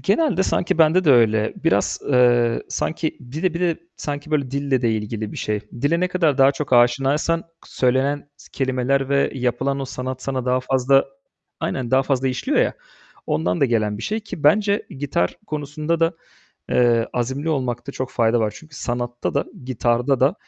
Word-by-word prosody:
Genelde 210 Hz, 0 st, +2 dB
sanki 175 Hz, -3 st, 0 dB
bende 165 Hz, +3 st, +4 dB
de 150 Hz, -, +5 dB
öyle. 110 Hz, -3 st, +3 dB
Biraz, 165 Hz, -, +1 dB
eee, 120 Hz, -3 st, +3 dB
sanki, 160 Hz, 0 st, -2 dB
dide 165 Hz, +3 st, -1 dB
bir 170 Hz, -, -3 dB
de 170 Hz, -3 st, +1 dB, 0.2 s
sanki 145 Hz, +1 st, -5 dB
böyle 140 Hz, -4 st, 0 dB
dille 140 Hz, -2 st, 0 dB
de 115 Hz, -, +2 dB
ilgili 110 Hz, 0 st, -4 dB
bir -, -, -8 dB
şey. 105 Hz, -1 st, -2 dB
Dile 145 Hz, +10 st, -1 dB
ne 180 Hz, -, +1 dB
kadar 165 Hz, -6 st, +1 dB
daha 135 Hz, +1 st, +6 dB
çok 140 Hz, -1 st, -5 dB
aşinaysan 135 Hz, +7 st, +3 dB
k -, -, -28 dB, 0.2 s
söylenen 135 Hz, +3 st, 0 dB
s -, -, -17 dB
kelimeler 130 Hz, 0 st, 0 dB
ve 140 Hz, 0 st, +2 dB
yapılan 135 Hz, +2 st, -1 dB
o -, -, -2 dB
sanat 130 Hz, 0 st, -5 dB
sana 130 Hz, -2 st, -2 dB
daha 125 Hz, 0 st, +1 dB
fazla 135 Hz, +1 st, +3 dB, 0.6 s
Aynen, 125 Hz, -3 st, -2 dB
daha 130 Hz, +1 st, +4 dB
fazla 135 Hz, -1 st, 0 dB
işliyor 125 Hz, -1 st, -1 dB
ya, -, -, +2 dB, 0.5 s
ondan 90 Hz, +3 st, 0 dB
da -, -, +5 dB
gelen 110 Hz, -4 st, 0 dB
bir -, -, -7 dB
şey 215 Hz, +2 st, -2 dB
ki 210 Hz, -8 st, -9 dB
bence 200 Hz, +6 st, +3 dB
gitar 135 Hz, -10 st, -1 dB
konusunda 150 Hz, +2 st, -2 dB
da, 165 Hz, +1 st, +3 dB, 0.6 s
eee, 120 Hz, -2 st, +3 dB
azimli 130 Hz, +5 st, -2 dB
olmakta 130 Hz, -2 st, -2 dB
çok 130 Hz, -1 st, -4 dB
fayda 115 Hz, 0 st, +2 dB
var. 105 Hz, -1 st, -1 dB
Çünkü 150 Hz, +4 st, -14 dB
sanatta 120 Hz, -1 st, -3 dB
da, 140 Hz, -, +1 dB, 0.2 s
gitarda 125 Hz, +1 st, +1 dB
da 135 Hz, +7 st, +4 dB
135 Hz, 180 wpm, -21 LUFS, 120-150 Hz, 0.6 s, daha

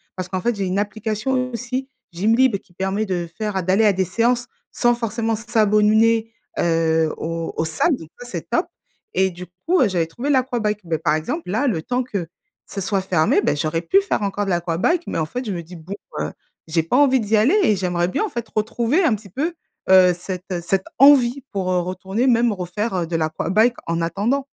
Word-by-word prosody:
parce 185 Hz, -1 st, -4 dB
qu'en 185 Hz, 0 st, -2 dB
fait, 240 Hz, +3 st, 0 dB
j'ai 200 Hz, -, -2 dB
une 185 Hz, +1 st, -1 dB
application 220 Hz, +5 st, -1 dB
aussi 255 Hz, +3 st, -3 dB, 0.2 s
Gymlib 225 Hz, +6 st, +3 dB
qui 190 Hz, -2 st, -25 dB
permet 190 Hz, +4 st, -1 dB
de 175 Hz, -2 st, -2 dB
faire, 210 Hz, -3 st, -2 dB
heu, 190 Hz, -, -1 dB
d'aller 190 Hz, +5 st, +3 dB
à 205 Hz, -, +5 dB
des 190 Hz, 0 st, 0 dB
séances, 240 Hz, +6 st, +1 dB, 0.2 s
sans 240 Hz, -1 st, +2 dB
forcément 230 Hz, -1 st, -1 dB
s'a 230 Hz, 0 st, 0 dB
abonner, 220 Hz, +2 st, +3 dB, 0.3 s
heu, 160 Hz, -1 st, +2 dB
aux 165 Hz, 0 st, -3 dB
aux 160 Hz, -, +1 dB
salles 160 Hz, -, +1 dB
donc 160 Hz, -, -12 dB
ça 245 Hz, -, -9 dB
c'est 245 Hz, -, -6 dB
top, -, -, +1 dB, 0.5 s
et 190 Hz, 0 st, +2 dB
du 180 Hz, +1 st, -9 dB, 0.2 s
coup, 365 Hz, +2 st, +3 dB
heu, 240 Hz, -, +5 dB
j'avais 175 Hz, -3 st, 0 dB
trouvé 240 Hz, -, -5 dB
l'aquabike. 240 Hz, -6 st, +1 dB
Beh 165 Hz, -1 st, -1 dB
par 155 Hz, -1 st, +1 dB
exemple 165 Hz, +3 st, -4 dB
là, 220 Hz, +9 st, 0 dB
le 175 Hz, -10 st, 0 dB
temps 250 Hz, +7 st, -1 dB
que 200 Hz, -8 st, -4 dB, 0.4 s
ça 195 Hz, -, -5 dB
soit 195 Hz, +1 st, 0 dB
fermé, 175 Hz, -4 st, +2 dB
beh, 145 Hz, -, +1 dB
j'aurais 155 Hz, +3 st, -1 dB
pu 390 Hz, -, +4 dB
faire 390 Hz, -, -1 dB
encore 205 Hz, +1 st, -1 dB
de 195 Hz, -, -3 dB
l'aquabike, 175 Hz, -, +1 dB
mais -, -, -2 dB
en 160 Hz, -, 0 dB
fait 250 Hz, +8 st, -5 dB
je 215 Hz, -, -3 dB
me 175 Hz, -, -4 dB
dis 175 Hz, +3 st, -12 dB
bon, 165 Hz, +5 st, -8 dB, 0.3 s
heu, -, -, -2 dB, 0.4 s
j'ai 160 Hz, 0 st, +1 dB
pas 165 Hz, +10 st, +1 dB
envie 270 Hz, -2 st, +5 dB
d'y 215 Hz, 0 st, +1 dB
aller 260 Hz, -, +4 dB
et 215 Hz, -, +4 dB
j'aimerais 175 Hz, -2 st, 0 dB
bien 300 Hz, -, -1 dB
en -, -, -4 dB
fait 235 Hz, -6 st, -5 dB
retrouver 235 Hz, -, +1 dB
un 310 Hz, -, +3 dB
petit 205 Hz, -1 st, -12 dB
peu, 300 Hz, -, -2 dB, 0.4 s
heu, 185 Hz, -1 st, +7 dB
cette 180 Hz, -1 st, -5 dB
cette 190 Hz, +2 st, 0 dB
envie, 275 Hz, -2 st, +6 dB
pour, 190 Hz, -3 st, -1 dB
heu, 180 Hz, -, +2 dB
retourner 190 Hz, +6 st, -2 dB
même 235 Hz, -1 st, +4 dB
refaire, 195 Hz, +3 st, -3 dB
heu, 175 Hz, -2 st, -1 dB
de 165 Hz, -, -3 dB
l'aquabike 185 Hz, +9 st, +1 dB
en 165 Hz, 0 st, -1 dB
attendant. 215 Hz, +11 st, 0 dB
205 Hz, 215 wpm, -21 LUFS, 175-240 Hz, 0.5 s, heu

